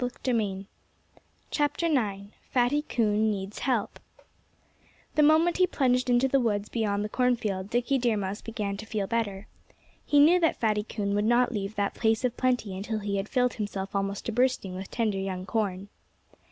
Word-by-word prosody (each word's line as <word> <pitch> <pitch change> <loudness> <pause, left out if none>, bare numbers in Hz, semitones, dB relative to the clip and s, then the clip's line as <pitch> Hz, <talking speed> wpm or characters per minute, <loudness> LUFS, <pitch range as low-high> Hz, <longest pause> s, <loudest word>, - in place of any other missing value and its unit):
IX 220 -6 -2 1.8
FATTY 255 +4 +2
COON 220 -2 +2
NEEDS 195 -1 -4
HELP 245 -6 -1 1.1
The 305 - +3
moment 315 +3 +4
he 365 0 +4
plunged 255 -5 +1
into 245 +2 +4
the 275 +1 +2
woods 210 -4 -1
beyond 210 -3 -1
the - - -2
cornfield 215 -5 0
Dickie 245 +3 +1
Deer 240 -3 +1
Mouse 200 +1 -3
began 210 -3 -4
to 215 +2 -9
feel 210 -3 -2
better. 205 -3 -2 0.6
He 290 - +3
knew 330 +5 +6
that 325 -2 +1
Fatty 215 -3 +1
Coon 205 -1 -3
would 205 0 +1
not 240 +2 +3
leave 205 -2 -4
that 200 -1 -1
place 225 +1 +1
of 245 - -1
plenty 245 -6 0
until 210 +3 -3
he 200 -1 -2
had 195 +2 -3
filled 250 -2 +1
himself 200 -2 -4
almost 200 0 -2
to - - -2
bursting 245 -5 +1
with 185 +1 -7
tender 215 -4 -1
young 190 -1 -4
corn. 195 -1 -2
220 Hz, 165 wpm, -27 LUFS, 200-250 Hz, 1.8 s, knew